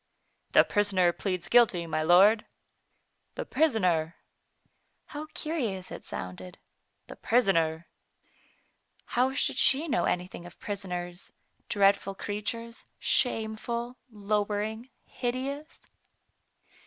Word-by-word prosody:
"The - - +8
prisoner 190 -4 +2
pleads 180 0 -3
guilty, 225 -8 +4
my 160 -1 -1
lord." 195 +7 +5 0.9
"The - - -4
prisoner! 180 - +1 0.9
How 300 +1 -7
curious 240 - -3
it - - -8
sounded. 90 0 -7 0.5
"The - - -10
prisoner! 170 -9 +1 1.2
How 255 +2 +1
should 280 - 0
she 290 +5 +3
know 175 - +1
anything 180 -1 -3
of 175 - -16
prisoners, 180 -3 -5 0.4
dreadful 200 -2 +3
creatures, 230 +4 -5
shameful, 235 0 0
lowering, 210 +2 -2 0.2
hideous? 270 +5 -4
205 Hz, 95 wpm, -28 LUFS, 180-240 Hz, 1.2 s, The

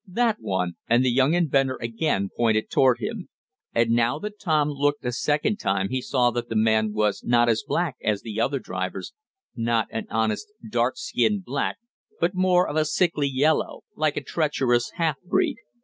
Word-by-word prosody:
"That 225 +3 +1
one!" 90 -2 -2
and 120 +2 +4
the 125 - +3
young 135 +6 +3
inventor 135 -6 +1
again 115 -4 -1
pointed 110 -2 +1
toward 130 -3 +4
him. 215 -5 -5 0.4
And, 115 0 +2
now 120 +1 +2
that 210 0 -7
Tom 155 -4 +1
looked 145 -1 -1
a 125 - 0
second 150 - 0
time 95 - -1
he 130 0 -1
saw 125 -2 +2
that 120 0 -4
the 115 - -3
man 110 0 +2
was 105 -1 0
not 120 0 +3
as 115 -1 +2
black 170 -7 -1
as 105 -2 0
the 110 -1 -3
other 135 +4 +1
drivers 95 -6 -5 0.4
not 115 -1 0
an 110 - -4
honest, 110 - -1 0.2
dark - - 0
skinned 205 -3 0
black - - -2 0.4
but 170 +3 +1
more 185 -1 +3
of 150 - -3
a 155 - +3
sickly 155 -3 +1
yellow, 145 +4 +1
like 155 -1 0
a - - -2
treacherous 130 -7 0
half 160 -5 -1
breed. 180 - 0
130 Hz, 180 wpm, -24 LUFS, 115-155 Hz, 0.4 s, and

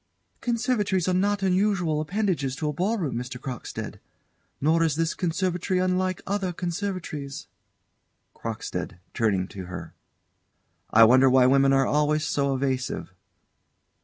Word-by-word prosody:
_] - - -45
Conservatories 230 -7 0
are 185 - +2
not 200 +2 +1
unusual 185 -5 +2
appendages 175 -6 -1
to 155 - -3
a 150 - -1
ball 195 +9 0
room, 160 -9 -2
Mr. 125 +1 -5
Crockstead; 125 -3 -6 0.6
nor 160 +4 +3
is 160 -3 +2
this 165 +1 0
conservatory 180 +1 -1
unlike 185 0 0
other 195 -2 -1
conservatories. 175 -5 -4 0.9
CROCKSTEAD - - -5 0.2
[Turning 100 -5 +1
to 95 -2 -7
her.] 90 +1 -8 1.0
I 115 - +7
wonder 130 +4 +6
why 130 0 +5
women 135 +1 +5
are 135 0 +4
always 150 +2 +1
so 140 -2 0
evasive? 130 -1 -2
160 Hz, 130 wpm, -26 LUFS, 135-185 Hz, 1.0 s, I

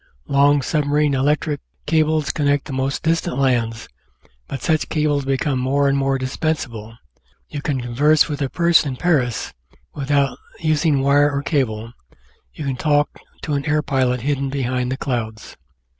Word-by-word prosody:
Long 140 0 +4
submarine 150 +1 +1
electric 145 +2 0 0.2
cables 155 -1 +1
connect 145 -1 +1
the 145 - -6
most 135 +1 -2
distant 160 -5 0
lands, 120 -4 0 0.6
but 135 - -6
such 155 -2 +1
cables 150 -3 0
become 135 0 0
more 140 +2 +1
and 140 - +2
more 135 0 +1
dispensable. 130 -5 -3 0.5
You 145 - -5
can 140 -3 -1
converse 140 +6 +3
with 145 -2 -4
a 135 - 0
person 170 -4 +3
in - - -6
Paris 130 -7 0 0.4
without 140 -1 0 0.2
using 155 -3 +2
wire 145 +1 +4
or 140 0 -2
cable; 115 -7 -1 0.6
you 150 - -7
can 135 -2 -2
talk 145 0 +2 0.3
to 150 - -2
an 140 -1 -1
air 150 0 +1
pilot 130 -4 0
hidden 140 +1 -1
behind 130 -2 -1
the 130 - -2
clouds. 110 -5 -4
140 Hz, 155 wpm, -20 LUFS, 130-150 Hz, 0.6 s, Long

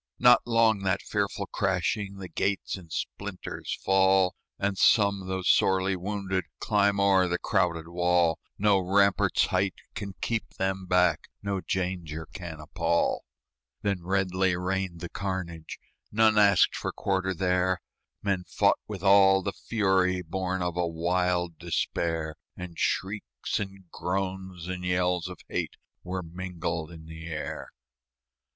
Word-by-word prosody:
Not 125 0 +7
long 115 -2 +4
that 95 -1 0
fearful - - -1
crashing, 100 +1 -1
The 95 -1 -7
gates 100 +2 -1
in 90 -4 -11
splinters 100 +3 -5
fall; 95 -1 +4 0.2
And 100 0 0
some, 100 -1 +4
though 95 0 -2
sorely 95 +1 +3
wounded, 95 -1 -2
Climb 100 -2 +2
o'er 95 -2 +4
the 90 0 0
crowded 85 -3 0
wall: 85 -1 +2 0.2
No 100 -1 +4
rampart's 100 +2 +3
height 95 +1 0 0.2
can 100 -3 -6
keep 115 -1 -2
them 95 0 -1
back, 90 -3 +3 0.2
No 100 -2 -1
danger 90 -4 -2
can 85 -4 -7
appall. 85 +2 0 0.6
Then 100 -3 0
redly 95 0 +1
rained 90 -1 -2
the 85 - -5
carnage 90 -4 -4 0.3
None 110 0 +4
asked 100 -1 +5
for - - -3
quarter 95 -1 -1
there; 90 +1 +1 0.4
Men 100 -3 0
fought - - +3
with - - -6
all 95 -1 +6
the 100 - -2
fury 95 -5 +1
Born 95 +2 -2
of 90 -1 -2
a 90 -1 +1
wild 85 0 0
despair; 80 -2 -2 0.2
And 90 -1 -7
shrieks 95 - -2
and 95 -2 -7
groans 95 -1 -3
and 90 0 -4
yells 90 0 +1
of 90 -2 -9
hate - - -3 0.3
Were 90 +1 -4
mingled 85 -2 -4
in 80 -2 -11
the 80 +1 -9
air. 80 -2 -5
95 Hz, 135 wpm, -28 LUFS, 90-95 Hz, 0.6 s, Not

